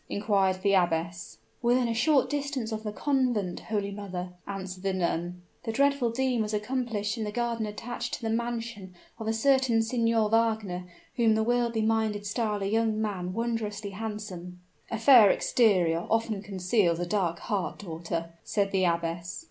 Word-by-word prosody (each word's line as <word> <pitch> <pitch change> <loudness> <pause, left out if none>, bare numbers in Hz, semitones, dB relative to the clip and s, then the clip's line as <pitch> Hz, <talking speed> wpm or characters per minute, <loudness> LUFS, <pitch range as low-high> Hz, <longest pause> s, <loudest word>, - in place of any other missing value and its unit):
inquired 195 -3 +1
the 200 -1 +3
abbess. 170 - 0 0.2
"Within 245 0 +3
a 230 - 0
short 270 +4 +3
distance 280 -5 -2
of 220 0 -3
the 215 -1 -4
convent, 245 -7 0
holy 205 -2 -2
mother," 185 -3 -6
answered 190 -2 -6
the 195 0 0
nun. 175 0 -2 0.2
"The 225 - -3
dreadful 280 0 +2
deed 250 0 0
was 215 0 -1
accomplished 220 -1 -2
in - - -1
the 210 - -3
garden 235 -1 -1
attached 235 +3 -4
to - - -11
the 225 - 0
mansion 230 -5 -3 0.2
of 220 - -5
a - - +2
certain 250 -1 +3
Signor 230 -1 +2
Wagner, 220 -5 +1 0.3
whom 225 -2 +4
the 220 - +2
worldly 235 -1 +1
minded 220 -2 0
style 210 -1 -1
a - - -1
young 220 +1 +1
man 190 -4 -2
wondrously 220 -2 -2
handsome." 195 -4 -6 0.3
"A 225 - -2
fair 230 -2 +8
exterior 180 -10 +2
often 225 -2 0
conceals 190 -2 +1
a 175 - -1
dark 175 -3 0
heart, 200 -3 -2
daughter," 165 -2 -5
said 200 -2 0
the 190 -1 +2
abbess. 170 0 -1
215 Hz, 165 wpm, -28 LUFS, 185-230 Hz, 0.3 s, fair